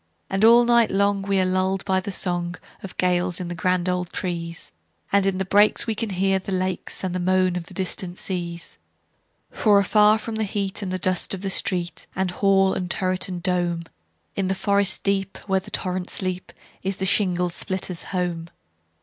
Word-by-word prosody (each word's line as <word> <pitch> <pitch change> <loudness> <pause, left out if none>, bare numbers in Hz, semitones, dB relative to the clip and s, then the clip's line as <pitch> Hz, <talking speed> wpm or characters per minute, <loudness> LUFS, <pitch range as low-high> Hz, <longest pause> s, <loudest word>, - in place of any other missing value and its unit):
And 195 +2 0
all 235 +2 +7
night 235 -1 +4
long 200 0 +1
we 195 0 0
are 185 - +3
lulled 185 +1 0
by 190 -2 +2
the 190 - -6
songOf 175 -2 -1 0.4
gales 180 -1 +1
in 180 -2 -5
the - - -3
grand 180 +1 0
old 180 -1 -1
trees; 170 -2 -4 0.4
And 200 -1 +3
in 190 -1 0
the 190 - -1
breaks 205 +3 +4
we 225 - -1
can 220 +1 -3
hear 195 0 +1
the 190 - -7
lakesAnd 185 0 -2
the 185 - -2
moan 185 0 +2
of 175 -1 -4
the - - -13
distant 185 -1 -2
seas. 175 -2 -4 0.7
For 210 -2 +3
afar 210 +2 +5
from 220 0 -5
heat 200 -2 -2
and 185 -2 -3
dust 185 +1 +1
of 195 +1 -3
street, 175 -2 0
And 190 -1 0
hall 195 0 +3
and 180 -1 -3
turret, 185 +1 0
and 175 -2 -5
dome, 175 -2 0 0.5
In 190 -1 0
forest 200 +1 +1
deep, 195 -1 0
where 190 -1 +2
the 190 - -12
torrents 185 -1 -2
leap, 185 -1 -3 0.3
Is 190 0 -2
the 190 - -2
shingle 180 -3 +2
splitter's 185 0 -2
home. 175 -3 -3
185 Hz, 180 wpm, -23 LUFS, 180-195 Hz, 0.7 s, all